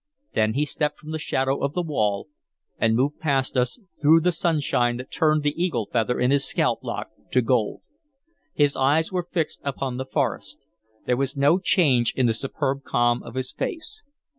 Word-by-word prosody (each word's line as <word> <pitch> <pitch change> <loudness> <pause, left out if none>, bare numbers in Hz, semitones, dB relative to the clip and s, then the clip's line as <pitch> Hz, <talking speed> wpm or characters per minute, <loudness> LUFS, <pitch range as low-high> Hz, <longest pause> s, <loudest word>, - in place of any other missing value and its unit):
Then 110 0 +1
he 150 +2 +2
stepped 150 0 -2
from 155 - -10
the 160 - -3
shadow 135 -2 0
of 140 +1 0
the 180 - 0
wall 105 -10 -1 0.5
and 110 0 +3
moved 140 +5 0
past 135 -4 0
us 125 - +1 0.2
through 160 +2 +6
the 180 +2 +2
sunshine 145 -8 +1
that 125 +1 -9
turned 155 -2 +2
the 145 0 +1
eagle 120 - -1
feather 120 +1 +1
in 125 +1 +2
his 140 -1 +3
scalp - - +1
lock - - -5 0.2
to 130 - +4
gold. 115 -3 0 0.7
His 145 -1 +3
eyes 150 +6 +2
were 180 -1 0
fixed 170 -2 -3
upon 135 -2 -3
the 130 - -3
forest; - - -2 0.4
there 125 - +1
was 135 +1 -1
no 145 +6 +4
change 140 - +3
in 130 - +2
the 115 - +3
superb 135 +3 -2
calm 120 -2 +1
of 115 +1 -10
his 130 0 -3
face. 420 +6 -4
140 Hz, 190 wpm, -24 LUFS, 125-155 Hz, 0.7 s, through